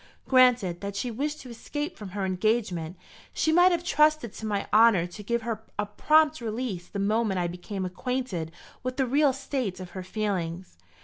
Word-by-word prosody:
Granted 250 -9 +4
that 200 0 -5
she 240 +4 -2
wished 295 +6 -3
to 255 - -11
escape 295 +7 -5
from 205 -3 -8
her 195 - 0
engagement, 185 -3 -1 0.4
she 315 - +2
might 355 +3 +6
have 345 -1 0
trusted 305 - +2
to 220 - -6
my 205 -2 -1
honour 215 -5 +6
to 180 +4 -9
give 235 +2 -1
her 225 -2 -3 0.2
a 210 - 0
prompt 305 +7 +3
release 220 -6 -4
the - - -7
moment 205 -1 +1
I 175 - 0
became 180 +3 -4
acquainted 185 -4 -3 0.3
with 255 0 -4
the 265 - +2
real 280 +3 +3
state 255 -8 -3
of 180 -1 -8
her 185 - -6
feelings. 185 - -3
220 Hz, 185 wpm, -27 LUFS, 185-255 Hz, 0.4 s, might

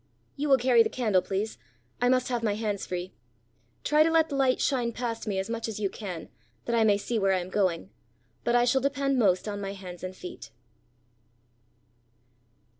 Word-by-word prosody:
"You 295 +1 -2
will 270 - +7
carry 245 -1 +5
the - - +3
candle, 215 -7 +2
please. 200 +4 -3 0.4
I 245 - +4
must 255 0 +2
have 240 -2 -1
my 210 -3 0
hands 210 -2 -2
free. 180 0 -4 0.7
Try 300 +1 +4
to 315 - +5
let 325 -1 +3
the 285 - -3
light 265 -2 +2
shine 245 -4 0
past 230 -2 -4
me 200 -2 -1
as 190 - -1
much 230 0 -3
as 220 -2 -5
you 200 -2 -1
can, 180 -7 -7 0.4
that 235 - 0
I 230 - +4
may 205 -2 +4
see 225 +3 -2
where 195 -1 +3
I 185 - +2
am 180 +1 -7
going. 175 - 0 0.5
But 240 - +1
I 240 0 +5
shall 265 +2 +3
depend 275 -1 +1
most 190 -3 +3
on 205 -1 -4
my 195 0 -4
hands 180 -3 -9
and 185 0 -5
feet." 180 -11 -9
225 Hz, 200 wpm, -28 LUFS, 195-250 Hz, 0.7 s, will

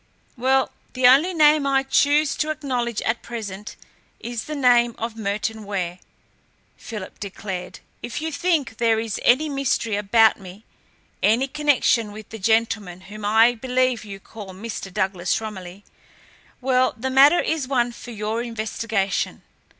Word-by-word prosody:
"Well, 265 +1 +1 0.2
the 255 0 0
only 275 +9 +6
name 300 -3 +4
I 270 -1 +2
choose 285 +2 +2
to 305 - -1
acknowledge 250 -7 -2
at 225 +1 -1
present 210 -3 -7 0.4
is 235 -2 -5
the 305 - -5
name 240 -4 +3
of 230 0 -4
Merton 215 +1 -3
Ware," 185 -3 -4 0.8
Philip 210 -5 -8
declared. 190 -2 -6 0.2
"If 240 +2 -5
you 320 +1 -3
think 295 -7 0
there 225 -1 +2
is 225 -2 -3
any 275 +6 +4
mystery 275 -6 -1
about 220 +2 +4
me, 195 +3 -12 0.6
any 230 +6 +3
connection 270 -6 +1
with 215 0 -11
the 225 - -8
gentleman 215 -4 0
whom 205 +2 -11
I 225 +3 +5
believe 250 -1 0
you 200 -2 -9
call 195 -2 -11
Mr. 205 -1 -6
Douglas 190 -2 -1
Romilly, 195 -3 -8 0.8
well, 255 0 +2
the 260 +3 -3
matter 280 +6 +6
is 315 -5 -1
one 245 -3 +1
for 240 - -11
your 220 0 -3
investigation. 220 -3 -2
230 Hz, 145 wpm, -22 LUFS, 210-260 Hz, 0.8 s, only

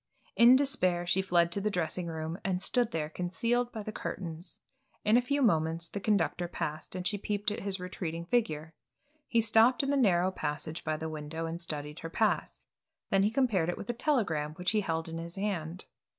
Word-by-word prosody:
In 240 +2 +8
despair 185 -11 +2
she 190 +2 +2
fled 175 -2 +2
to 200 - +1
the 210 - +1
dressing 180 -1 -1
room 160 +2 -4
and 185 -2 0
stood 240 +4 +1
there 155 -2 -2
concealed 230 +9 -1
by 220 -2 -5
the 215 - -5
curtains. 170 -4 -6 0.5
In 215 +2 +5
a 245 - +6
few 280 +3 0
moments 165 -4 +2
the 200 - -5
conductor 190 -4 +1
passed, 155 0 -5
and 180 -1 -4
she 205 +2 0
peeped 205 +1 -1
at 210 - -3
his 195 -1 -3
retreating 170 -2 -4
figure. 165 -8 0 0.5
He 230 - +3
stopped 225 +4 +4
in 275 - 0
the - - +2
narrow 185 -7 +3
passage 155 -2 -4
by 155 -1 -1
the 160 - -4
window 155 +1 -5
and 165 +1 -4
studied 150 -2 -4
her 165 - -6
pass, 215 +5 0 0.5
then 195 - +4
he 205 - +3
compared 220 -9 +1
it 175 - -2
with 205 - -3
a - - -6
telegram 195 - 0
which 180 +1 0
he 215 -1 +2
held 165 -3 -2
in 165 0 -5
his 170 +1 -4
hand. 185 -4 -3
180 Hz, 205 wpm, -30 LUFS, 165-215 Hz, 0.5 s, In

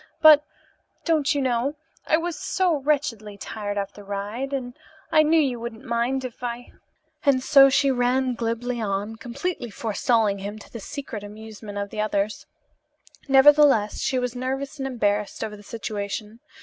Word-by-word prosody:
But, 305 -2 +8 0.6
don't 310 -2 +2
you 280 - +1
know, 255 +3 0 0.3
I 315 - +4
was 335 0 -3
so 360 -4 +1
wretchedly 265 -8 -1
tired 205 0 -5
after 200 +1 -4
the - - -13
ride, 205 +7 -4
and 255 -3 -3 0.4
I 310 - +6
knew 315 +2 +4
you 260 -6 +1
wouldn't 235 +1 -7
mind 240 +3 0
if 245 -2 -8
I 245 0 -5 0.3
" 310 0 -44
and 270 -3 +3
so 275 0 +7
she 275 0 +3
ran 255 +1 +1
glibly 235 +1 -2
on, 205 +1 -2
completely 245 +4 -4
forestalling 220 -1 +1
him, 205 +2 -6
to 215 - -14
the 230 - -6
secret 225 -2 -6
amusement 210 0 -9
of 200 0 -4
the 210 - -2
others. 210 0 -1 0.8
Nevertheless, 270 -5 +5
she 260 - 0
was 250 -1 -2
nervous 270 +3 -3
and 270 - -2
embarrassed 210 -5 -1
over 210 - -4
the 205 - -13
situation. 210 0 -5
240 Hz, 165 wpm, -24 LUFS, 210-275 Hz, 0.8 s, But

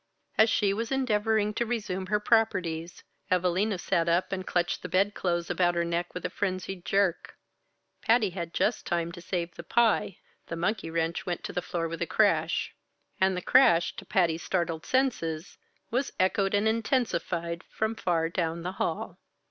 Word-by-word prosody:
As 220 +1 +5
she 205 -2 +2
was 230 +4 -3
endeavoring 220 -5 +1
to 235 - 0
resume 205 -6 -3
her 210 +2 +1
properties, 180 -7 0 0.3
Evalina 185 +3 +1
sat 170 -1 0
up 170 +2 +1
and 185 -1 -3
clutched 175 -1 0
the - - -6
bed 200 +2 +2
clothes 175 -2 -1
about 175 0 +2
her 170 0 +1
neck 170 +1 -2
with 180 - -5
a - - 0
frenzied 185 -2 -3
jerk. 195 -3 0 0.6
Patty 225 -4 +3 0.2
just 215 - +1
had - - +2
time 170 0 -2
to 175 0 -10
save 175 -1 -3
the - - -8
pie 225 -2 +2 0.3
the 165 - -4
monkey 185 +2 -1
wrench 165 +1 -2
went 175 -1 -2
to - - -5
the 180 - -1
floor 170 -1 -2
with 165 0 -6
a - - 0
crash; - - +2 0.5
and 190 -1 +3
the 180 - -4
crash, 175 -11 +5
to - - -7
Patty's 170 -3 +1
startled 170 -3 -2
senses, 195 -11 -1 0.3
was 255 +4 -1
echoed 195 +1 +2
and 205 +2 +2
intensified 180 -8 -1
from 220 +1 -1
far 170 -6 0
down 170 -1 -2
the 180 - -2
hall. - - -2
185 Hz, 175 wpm, -28 LUFS, 170-210 Hz, 0.6 s, As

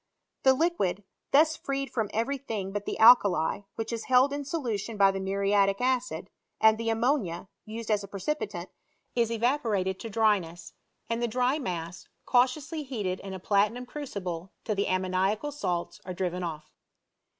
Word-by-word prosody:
The 265 0 +5
liquid, 205 - 0 0.3
thus 310 +3 +5
freed 275 0 -3
£rom 220 -4 -1
every 265 +5 -1
thing 210 -8 -4
but 205 0 -4
the - - -3
alkali, 205 -7 +6
which 225 +1 -4
is 230 - -4
held 260 +2 +4
in 285 0 -3
solution 235 -8 -3
by 195 -1 +6
the 195 - -4
muriatic 195 +1 +2
acid, 255 0 -1 0.3
and 220 0 +5
the 230 0 -1
ammonia, 225 - 0 0.2
used 225 +1 -5
as 205 -1 +2
a - - -7
precipitant, 200 +11 -4 0.4
is 235 -2 +1
evaporated 225 -6 0
to 225 - -6
dryness, 195 -6 0 0.3
and 230 +1 -2
the 240 - +1
dry 250 +5 +1
mass, 175 - -5 0.2
cautiously 280 +6 +1
heated 210 -10 -3
in 195 -1 -7
a - - -6
platinum 210 +6 +1
crucible 195 - -5
till 215 - -1
the 200 0 0
ammoniacal 185 +8 0
salts 180 -12 -3
are 185 -1 -6
driven 180 -1 -2
off. 155 -3 -5
215 Hz, 160 wpm, -28 LUFS, 190-250 Hz, 0.4 s, alkali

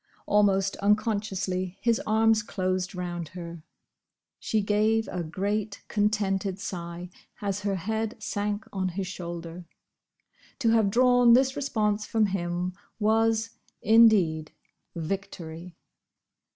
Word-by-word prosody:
Almost 195 -2 +2
unconsciously 200 -3 0
his 235 -1 +1
arms 220 0 +4
closed 185 -2 -2
round 175 -2 -4
her. 170 -1 -7 0.8
She 215 -2 0
gave 215 +2 +2
a 180 - -3
great, 200 +5 -3
contented 200 -2 0
sigh, 175 -2 -6 0.3
as 200 -1 -2
her 200 -1 -1
head 220 +4 -2
sank 205 +1 -3
on 190 -1 -1
his 190 +2 -3
shoulder. 170 -1 -7 0.9
To 240 -5 +1
have 225 -3 +4
drawn 245 +1 +5
this 265 +2 +4
response 215 -6 -1
from 220 -1 +2
him 180 -2 -2 0.3
was, 225 +1 +2 0.3
indeed, 200 -9 +4 0.4
victory! 170 -1 -5
200 Hz, 110 wpm, -27 LUFS, 180-220 Hz, 0.9 s, drawn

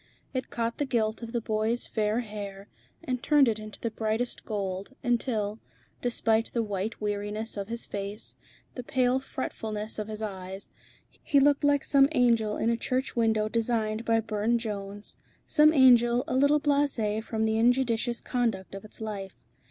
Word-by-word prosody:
It 255 -1 -3
caught 230 0 -2
the 290 - +1
gilt 225 -4 0
of 230 -1 -6
the 235 -1 -1
boy's 220 +2 0
fair 215 +1 0
hair 205 -3 -7 0.4
and 250 -1 -2
turned 290 -1 +5
it 220 -2 0
into 215 +2 -5
brightest 220 +3 -1
gold, 200 +2 -4
until, 230 -3 0 0.4
despite 225 -2 +2
the 235 - +1
white 205 +1 -3
weariness 210 +1 -2
of 200 -1 -4
his 235 +1 -1
face, 200 +1 -4 0.4
the 250 - -5
pale 250 +1 +1
fretfulness 220 -5 -5
of 215 - -3
his 215 0 -5
eyes, 190 -1 -6 0.5
he 285 - +3
looked 285 +1 +4
like 285 -1 +3
some 275 -1 +5
angel 230 -5 +3
in 230 - +1
a 230 - 0
church 255 +3 -2
window 220 -2 +2
designed 225 -1 0
by 225 -1 +2
Burne 220 +1 0
Jones, 205 -2 -5 0.3
some 305 0 +5
angel 245 -4 +5
a - - -2
little 285 +3 +4
blasé 275 -8 +1
from 220 -1 -2
the 220 0 +1
injudicious 240 -1 +2
conduct 230 -8 -1
of 195 - -7
its 215 - -11
life. 200 -3 -5
225 Hz, 165 wpm, -28 LUFS, 210-245 Hz, 0.5 s, turned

